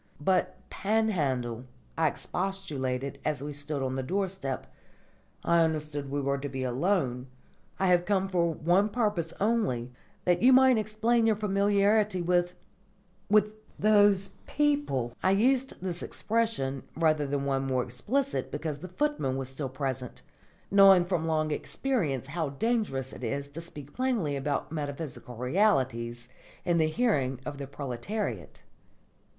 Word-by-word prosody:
"But, 185 +5 +1
Panhandle," 145 - 0 0.3
I 160 -1 +3
expostulated 140 -8 -3
as 150 -3 -1
we 145 0 -5
stood 145 -1 -3
on 130 0 -1
the 135 - -1
doorstep, 185 -3 -2 0.8
"I 170 0 +3
understood 150 -3 -2
we 145 +1 -1
were 140 0 0
to 145 +1 -4
be 130 0 -4
alone. 130 -1 0 0.5
I 190 - +2
have 175 -1 +4
come 195 0 +1
for 175 -3 +1
one 175 +6 +2
purpose 205 -8 0
only, 200 - 0 0.3
that 175 -1 +3
you 255 +2 +7
might 260 -2 +6
explain 225 +2 +1
your 220 - +4
familiarity 205 0 +2
with 175 0 +1 0.7
with 210 0 +4 0.3
those 205 -2 +4 0.2
people." 285 - 0
I - - +3
used 255 +6 +2
this 180 -2 -3
expression, 215 - -1 0.2
rather 155 -3 +2
than 140 0 -1
one 135 -1 0
more 130 -1 +1
explicit, 255 - -1
because 150 -1 -4
the 185 - -7
footman 185 - -1
was 135 -1 -4
still 135 0 -4
present, 130 -2 -4 0.5
knowing 195 -2 +7
from 175 -3 -1
long 155 -1 +1
experience 150 - -1
how 155 +2 -2
dangerous 140 - -1
it - - -9
is 140 +4 -2
to 155 +4 -7
speak 145 -4 -10
plainly 235 - 0
about 140 +2 -2
metaphysical 145 -4 -5
realities 125 - +1 0.4
in 175 -2 +2
the 160 - +3
hearing 155 - +1
of 145 -1 -5
the 140 - -5
proletariat. 135 - -5
160 Hz, 140 wpm, -29 LUFS, 135-205 Hz, 0.8 s, you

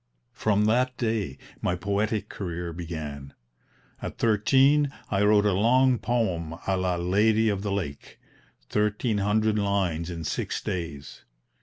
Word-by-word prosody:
"From 105 -2 +1
that 125 +3 +2
day 110 - -1 0.2
my 90 - 0
'poetic 100 +3 -1
career' 85 -4 -5
began. 75 -5 -6 0.7
At - - -6
thirteen 135 +6 +3 0.2
I 95 - +1
wrote 105 0 +4
a 105 - +3
long 125 +5 +3
poem 90 -10 -1
a 95 - +1
la 90 -1 0
'Lady 105 +6 +2
of 100 -2 -1
the 100 -1 -3
Lake' 85 -8 -5 0.5
1300 105 0 +1
lines 95 -5 0
in 85 -2 -5
six 75 - -2
days. 75 -6 -5
100 Hz, 130 wpm, -26 LUFS, 85-110 Hz, 0.7 s, wrote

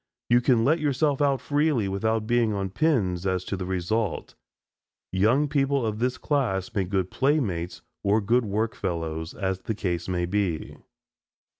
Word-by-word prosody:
You 120 +1 +6
can 120 -3 +3
let 160 +5 +3
yourself 145 -1 +1
out 140 -3 +2
freely 145 -6 +1
without 110 +3 0
being 115 -1 +2
on 95 -2 -2
pins 95 - +1
as 95 -1 -1
to - - -3
the 90 -1 -5
result. 95 +4 -2 0.8
Young 115 +10 +3
people 140 -3 +1
of 105 -1 -2
this 125 +1 0
class 120 - -1
make 95 -3 -1
good 95 -2 -1
playmates 110 - 0 0.2
or 100 +2 +3
good 115 +4 +2
work 110 +3 -1
fellows, 80 -3 -3
as 95 -2 -2
the 110 +3 -4
case 90 -3 -2
may 90 -1 0
be. 90 -3 -2
105 Hz, 160 wpm, -26 LUFS, 95-130 Hz, 0.8 s, You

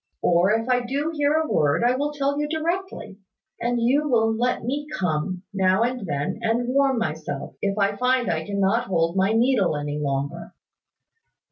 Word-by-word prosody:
Or, 175 +3 +3
if 225 +2 0
I 250 -1 +2
do 280 +6 -2
hear 295 -1 +1
a 315 0 +1
word, 150 - +2
I 245 +1 +3
will 290 +3 -1
tell 285 0 -1
you 295 - -1
directly. 320 - -3 0.4
And 240 0 0
you 280 +6 +2
will 225 -3 +3
let 245 +1 0
me 285 +5 -3
come, 180 +1 -2
now 190 +2 +2
and 245 -4 -2
then, 145 +6 -2
and 235 +2 0
warm 270 0 +2
myself, 155 -7 -4
if 200 0 -1
I 200 0 +1
find 250 0 +1
I 160 -1 -1
cannot 200 +4 +1
hold 170 -2 0
my 195 +3 +2
needle 225 - +2
any 145 0 -3
longer." 140 -1 -3
225 Hz, 175 wpm, -24 LUFS, 180-260 Hz, 0.4 s, Or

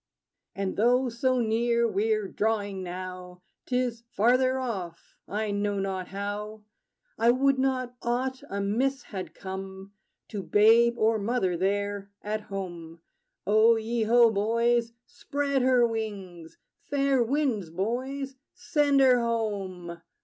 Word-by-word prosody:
And, 195 -1 -3
though 245 +4 +3
so 255 +2 0
near 235 +1 +2
we're 215 -1 0
drawing, 205 -2 -1
now, 180 0 -7 0.2
'T 250 - 0
is 235 -2 -2
farther 255 +4 +3
off 195 -10 -5
I 210 +1 -2
know 205 0 -1
not 190 -2 -3
how 205 +2 -5 0.6
I 230 - +4
would 265 +2 +3
not 255 -2 0
aught 255 +2 -1
amiss 225 +8 -1
had 190 -3 -7
come 190 +1 -8 0.4
To 205 -3 -4
babe 230 +4 +4
or 220 0 +2
mother 200 -4 0
there, 200 +2 -1
at 215 +1 -2
home! 175 -5 -7 0.4
O 215 +3 +5
ye 225 +1 -2
ho, 230 +1 +5
boys! 230 +3 +1
Spread 285 -1 -2
her 250 -1 +4
wings! 200 -7 -5 0.2
Fair 275 -2 +1
winds, 240 - 0
boys: 260 +9 -3 0.2
send 285 -3 +2
her 255 -2 +6
home! 195 -7 -3
220 Hz, 125 wpm, -27 LUFS, 195-245 Hz, 0.6 s, her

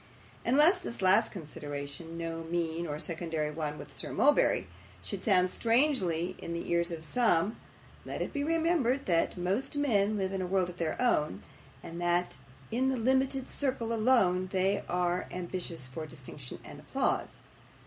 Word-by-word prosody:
And 245 +4 +2
lest 350 +5 +6
this 235 - -5
last 195 +4 +5
consideration 150 -1 -7
no 165 -1 -4
mean 170 0 -1
or 150 -1 -3
secondary 160 -2 -2
one 150 -1 -3
with - - -10
Sir - - -4
Mulberry 290 +2 +4 0.4
should - - -5
sound 185 -4 +4
strangely 215 - +1
in 170 - -5
the 170 - -4
ears 170 0 +2
of 165 -2 -5
some, 210 -1 +2 0.5
let - - -5
it - - -3
be 285 -2 -1
remembered 320 -5 +2
that 170 -1 +1
most 195 +11 -1
men 215 -7 +2
live 190 -1 -1
in 190 - -1
a 185 - -2
world 185 -1 +1
of 180 - -9
their 165 -2 -2
own, 150 - +1 0.4
and 170 +1 -6
that 175 +1 +1 0.4
in 255 +4 +2
that 265 - 0
limited 265 +2 +1
circle 255 -5 -1
alone 215 -6 +3 0.4
are 180 0 +1
they - - -7
ambitious 175 -4 -4
for 155 +5 -6
distinction 140 -3 -8
and - - -10
applause. - - -1
180 Hz, 165 wpm, -31 LUFS, 165-240 Hz, 0.5 s, lest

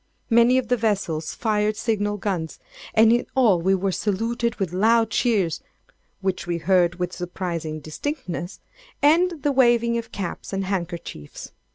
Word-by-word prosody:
Many 235 +2 +5
of 260 -2 0
the 245 - +2
vessels 195 -8 -1
fired 215 -1 0
signal 205 -2 -1
guns; 185 -6 -3 0.4
and 225 +1 +6
in 240 - 0
all 220 -10 +4
we 190 +3 +3
were 190 +1 -1
saluted 230 +5 -1
with 190 -4 -3
loud 225 +3 +3
cheers 200 -10 +1 0.6
(which 190 -2 -2
we 170 -1 -1
heard 175 0 +2
with 180 0 -3
surprising 170 -3 -4
distinctness) 175 - -5 0.4
and 330 +1 +3
the 290 - +2
waving 235 -3 +3
of 230 - -9
caps 195 0 -5
and 195 0 -1
handkerchiefs. 170 - -5
205 Hz, 150 wpm, -23 LUFS, 175-235 Hz, 0.6 s, and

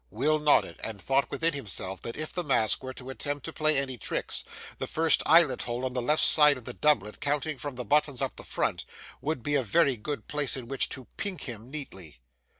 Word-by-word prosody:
Will 150 +9 +1
nodded, 150 -1 +2
and 110 -2 -4
thought 135 +6 0
within 165 0 +1
himself 95 -8 -4
that 115 - -6
if 155 0 -5
the 180 - -1
Mask 115 -8 +2
were 130 0 -7
to 130 0 -8
attempt 145 +1 -4
to 160 - -7
play 155 -1 +3
any 130 -3 +1
tricks, - - -3 0.4
the - - -3
first 160 -1 +3
eyelet 155 -5 +5
hole 120 +2 -3
on 130 - -3
the 125 - -1
left 150 +6 +2
hand - - +8
side 150 -2 +6
of 125 - -12
his 125 - -6
doublet, 105 -9 +2
counting 145 0 -1
from 145 0 -5
the 125 0 -5
buttons 145 +1 +1
up 135 -1 -2
the - - -9
front, - - -1 0.4
would 150 -5 -3
be 145 - -2
a 140 - +3
very 140 +3 +2
good 145 +7 -5
place 145 -3 +1
in 125 -3 -7
which 135 +1 0
to 130 -2 -8
pink 195 -3 -4
him 115 -1 -8
neatly. 95 - -7
135 Hz, 230 wpm, -28 LUFS, 125-150 Hz, 0.4 s, hand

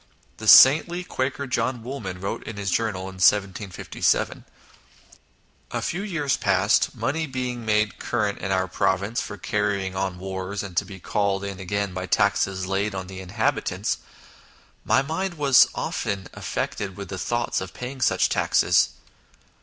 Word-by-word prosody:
The 110 - -7
saintly 160 +10 +8
Quaker 140 -3 -2
John 125 -2 -1
Woolman 110 -8 -6
wrote 100 +1 -3
in 110 - -6
his 100 -2 -2
journal 110 -2 0
in 95 0 -8
1 - - -13
7 95 +1 +4
5 95 -2 -8
7 - - +2 0.6
" - - -29
A - - -2
few 175 - -2
years 165 -9 0
past, 95 +6 +2
money 140 +8 -1
being 125 -2 -4
made 105 -1 +1
current 105 -4 -1
in 95 - -3
our 95 -1 +1
province 100 +5 0
for 105 - -6
carrying 100 -1 -1
on 95 -1 -2
wars, 95 +2 -4
and 95 -3 -8
to 105 - +2
be 95 0 -10
called 100 +1 -1
in 100 -1 -5
again 100 +1 -2
by 90 0 -4
taxes 100 -2 +1
laid 95 +2 -1
on 95 -1 -4
the 95 0 -9
inhabitants, 90 -1 -1 0.8
my 135 - +3
mind 170 +5 -3
was 140 -4 +6
often 100 -2 -3
affected 95 -3 -4
with 100 -2 -7
the 95 -2 -5
thoughts 120 0 -1
of 95 - -7
paying 130 +2 -6
such - - +3
taxes - - +3
100 Hz, 165 wpm, -24 LUFS, 95-125 Hz, 0.8 s, saintly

